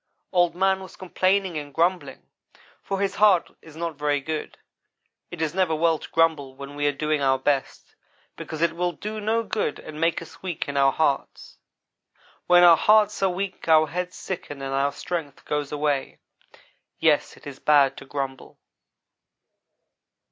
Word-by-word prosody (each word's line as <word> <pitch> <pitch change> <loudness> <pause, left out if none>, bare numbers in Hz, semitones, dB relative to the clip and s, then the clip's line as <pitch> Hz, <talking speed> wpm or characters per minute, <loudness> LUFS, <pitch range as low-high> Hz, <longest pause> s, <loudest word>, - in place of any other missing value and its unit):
Old 175 -2 +2
man 190 +1 +2
was 190 - -11
complaining 185 -2 0
and 145 -1 -9
grumbling, 175 +5 -1 0.6
for 195 - -3
his 200 -1 0
heart 205 -5 +4
is 160 -2 -15
not 165 0 -3
very 145 -1 +1
good. 155 +2 -5 0.7
It 165 -2 -4
is 155 -1 -1
never 180 -4 +1
well 165 0 +2
to - - -10
grumble 155 -5 +1
when 140 +1 -9
we 145 0 0
are - - +3
doing 150 +1 -1
our 135 -1 +3
best, 135 0 -2 0.4
because 160 +1 -5
it 170 -1 +2
will 175 0 -1
do 215 +3 -6
no 225 +2 0
good 210 -9 -2
and 155 0 -9
makes 165 0 +1
us 165 - -15
weak 180 -4 -4
in 145 - -5
our 135 -1 +4
hearts. 140 -2 -2 0.9
When 175 0 +6
our 170 -2 +8
hearts 210 -1 +3
are 195 - +3
weak 185 0 -5
our 155 -1 +6
heads 180 +3 -4
sicken 155 -6 -6
and 135 0 -4
our 140 +1 +1
strength 160 -5 -6
goes 150 -1 -2
away. 145 -2 -1 0.8
Yes, - - +2
it - - -18
is 140 -2 -9
bad 145 -3 +4
to - - -10
grumble. 135 -1 -6
160 Hz, 170 wpm, -24 LUFS, 145-180 Hz, 0.9 s, our